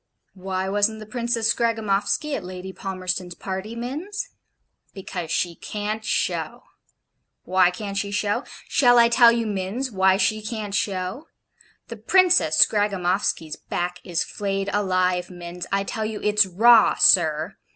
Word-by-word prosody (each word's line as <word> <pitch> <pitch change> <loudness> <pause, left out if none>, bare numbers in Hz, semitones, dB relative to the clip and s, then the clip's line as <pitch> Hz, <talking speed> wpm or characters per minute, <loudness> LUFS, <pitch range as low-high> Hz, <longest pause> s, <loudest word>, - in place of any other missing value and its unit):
Why 190 0 -4
wasn't 205 +2 +1
the 215 - -9
Princess 235 0 0
Scragamoffsky 225 +5 0
at 200 - -5
Lady 185 +1 -8
Palmerston's 185 -2 -4
party, 195 +4 -6
Minns? 330 - -5 0.7
Because 180 -3 -6
SHE 170 +1 -1
CAN'T 210 +1 -4
SHOW - - -2 0.8
why 185 -1 +3
can't 200 +2 -6
she 200 +1 -2
show? 205 0 -1 0.2
Shall 245 -3 +4
I 235 0 +6
tell 235 0 +6
you, 235 -1 -1
Minns, 210 +6 -3
why 190 -1 +3
she 215 +1 +1
can't 215 -2 -5
show? 195 - -3 0.6
The - - -7
Princess 370 -1 +3
Scragainoffsky's 190 -6 -1
back 175 0 -4
is 175 -2 -1
flayed 195 -1 -3
alive, 185 -3 0
Minns 175 0 -8
I 195 0 +1
tell 215 +2 -4
you 215 -1 -4
it's 210 -1 +3
raw, 225 +5 +5
sir! - - +3
200 Hz, 140 wpm, -23 LUFS, 185-225 Hz, 0.8 s, I